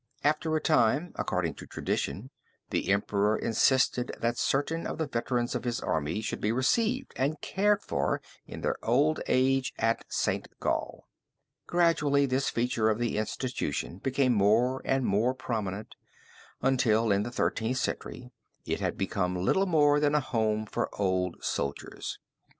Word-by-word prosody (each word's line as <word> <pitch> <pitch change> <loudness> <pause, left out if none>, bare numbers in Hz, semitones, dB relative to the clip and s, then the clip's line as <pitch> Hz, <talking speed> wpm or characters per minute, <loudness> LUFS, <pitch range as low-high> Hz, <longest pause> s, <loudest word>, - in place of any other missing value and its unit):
After 155 +2 +1
a - - +2
time 150 +3 +2
according - - -1
to - - -11
tradition, 125 +8 -3 0.4
the - - -1
emperor 100 +1 +2
insisted 125 +1 +2
that 120 +1 0
certain 160 +4 0
of - - -4
the 160 - 0
veterans 120 -2 -1
of 125 -3 -3
his 120 -1 -1
army 80 +6 -1
should 110 - -4
be 105 - +1
received 225 - +1
and 145 +4 0
cared 205 +1 +1
for 70 -1 0 0.3
in - - -8
their - - 0
old 145 +7 +2
age 130 0 +2
at 115 +1 +1
St. - - -1
Gall. - - -2 0.6
Gradually 150 -5 +3
this 135 +1 0
feature 115 -2 +1
of 110 - +1
the 120 -2 -1
institution 110 -5 -3
became 130 +1 +1
more 115 +5 +3
and 135 -1 +1
more 110 +6 +2
prominent 110 -5 -4 0.7
until 115 -4 +3
in 100 0 +3
the 115 - -3
Thirteenth 120 0 -1
Century 125 0 -4 0.3
it - - -2
had - - -2
become 90 -2 -1
little 145 - +2
more 145 -4 +4
than 145 0 +2
a - - +5
home 110 -5 0
for - - -2
old 95 -2 +1
soldiers. 70 0 -3
125 Hz, 150 wpm, -29 LUFS, 110-140 Hz, 0.7 s, a